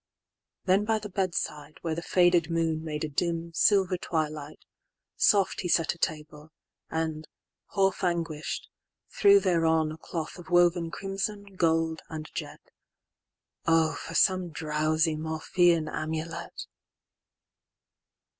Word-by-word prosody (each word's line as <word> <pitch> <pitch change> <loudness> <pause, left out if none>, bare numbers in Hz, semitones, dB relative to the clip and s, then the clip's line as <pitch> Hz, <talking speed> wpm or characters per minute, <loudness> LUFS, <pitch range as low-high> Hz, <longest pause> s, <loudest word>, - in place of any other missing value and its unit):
XXIX.Then 195 +2 +2
by 220 0 +2
the 210 -1 -7
bed 185 -2 -1
side, 150 0 -4
where 165 -2 -1
the 165 - -3
faded 175 -1 +3
moonMade 160 -2 -2
a - - -1
dim, 170 +2 -2
silver 190 0 +3
twilight, 155 -3 -3 0.6
soft 200 -3 +3
he 180 - -3
setA 165 0 +1
table, 150 -1 -4 0.4
and, 160 -1 -3 0.5
half 195 -1 +2
anguish'd, 165 -3 -2 0.5
threw 405 -5 +7
thereonA 160 - +1
cloth 165 +2 -5
of 175 - -12
woven 175 -1 +3
crimson, 195 +2 -4
gold, 165 -2 +1
and 155 -1 -7
jet:—O 165 -1 -4
for 165 - -7
some 185 -1 +3
drowsy 155 +1 0
Morphean 160 +1 +1
amulet! 160 +2 -5
165 Hz, 110 wpm, -28 LUFS, 155-180 Hz, 0.6 s, threw